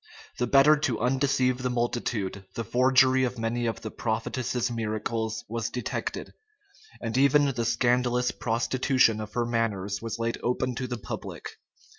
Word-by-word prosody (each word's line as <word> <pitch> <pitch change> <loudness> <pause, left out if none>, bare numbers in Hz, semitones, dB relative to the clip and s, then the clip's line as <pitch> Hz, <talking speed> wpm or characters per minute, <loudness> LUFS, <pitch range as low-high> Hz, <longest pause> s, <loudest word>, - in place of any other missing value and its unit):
The 125 - +1
better 140 +4 +6
to 130 -6 -1
undeceive 130 0 +1
the 125 0 -1
multitude, 120 -5 -2
the 115 - -2
forgery 130 +3 +4
of 125 0 -1
many 115 +1 -1
of 115 - -3
the 110 - -6
prophetess's 120 +2 -2
miracles 110 0 -3
was 115 0 -3
detected; 125 +1 -4 0.7
and 115 -1 -4
even 140 +1 +4
the 120 -1 -2
scandalous 125 +1 +2
prostitution 120 0 +1
of 105 0 -8
her 120 -1 0
manners 105 -4 -1
was 115 0 -4
laid 115 0 -2
open 125 +1 -1
to 130 +2 -4
the 120 -1 -4
public. 110 - -7
120 Hz, 150 wpm, -27 LUFS, 115-130 Hz, 0.7 s, better